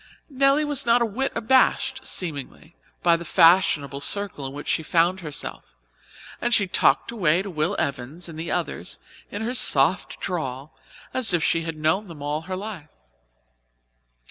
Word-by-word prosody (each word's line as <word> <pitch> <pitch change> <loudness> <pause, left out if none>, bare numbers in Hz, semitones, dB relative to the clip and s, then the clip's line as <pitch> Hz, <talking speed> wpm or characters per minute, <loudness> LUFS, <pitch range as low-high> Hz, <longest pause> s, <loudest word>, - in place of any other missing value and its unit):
Nelly 275 +2 +3
was 290 -3 +2
not 235 0 +3
a - - +2
whit 255 +5 -2
abashed, 265 +2 +2
seemingly, 160 -1 -5 0.3
by 170 -1 +5
the 170 - -5
fashionable 165 -5 +3
circle 195 -5 -2
in - - -7
which 145 +1 -8
she - - +1
found 170 +3 +1
herself, 150 - -6 0.7
and 240 0 +3
she 205 - +3
talked 145 -4 +2
away 180 -5 +1
to 195 - -7
Will 160 +4 -1
Evans 140 +6 -3
and 160 -2 -9
the 165 +1 -5
others - - -3 0.3
in 205 +2 -5
her 240 +3 -2
soft 165 - +3
drawl 140 -6 -5 0.4
as 225 -8 +2
if 165 - 0
she 165 - +2
had 165 -1 -5
known 160 +7 0
them 155 -5 -10
all 150 +1 -2
her 185 - -2
life. 190 -6 -7
175 Hz, 165 wpm, -24 LUFS, 150-215 Hz, 0.7 s, by